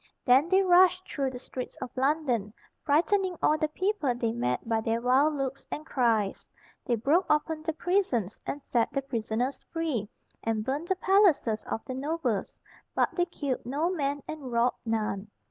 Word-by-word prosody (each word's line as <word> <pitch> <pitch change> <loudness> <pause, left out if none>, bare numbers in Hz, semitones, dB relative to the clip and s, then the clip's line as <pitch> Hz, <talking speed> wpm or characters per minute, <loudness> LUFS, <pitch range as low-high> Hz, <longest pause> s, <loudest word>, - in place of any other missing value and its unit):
Then 265 +6 +5
they 385 +1 +4
rushed 370 0 +5
through 275 -2 -1
the 255 - -7
streets 255 0 -7
of 255 - -7
London, 255 -6 0 0.3
frightening 355 +5 +2
all 305 - +3
the 310 0 0
people 345 - 0
they 230 -2 -1
met 125 - -2
by 225 -1 +1
their 225 +1 0
wild 265 +5 +3
looks 270 -1 -4
and 305 - -5
cries. 225 -8 0 0.3
They 240 - +1
broke 295 - +2
open 310 +1 +1
the 320 0 -2
prisons, 320 - 0
and 285 0 -4
set 235 -2 +1
the 275 - -2
prisoners 240 +1 -2
free, 300 - -2 0.3
and 225 -1 0
burned 290 +6 -2
the 380 - +1
palaces 370 - +3
of 225 - -4
the 255 - -5
nobles, 265 -6 -2 0.4
but - - +2
they 350 - +1
killed 285 -7 -3
no 295 +8 -1
man 285 -5 -2
and 295 -5 -6
robbed 235 +1 +1
none. 215 -2 -1
275 Hz, 175 wpm, -28 LUFS, 235-320 Hz, 0.4 s, Then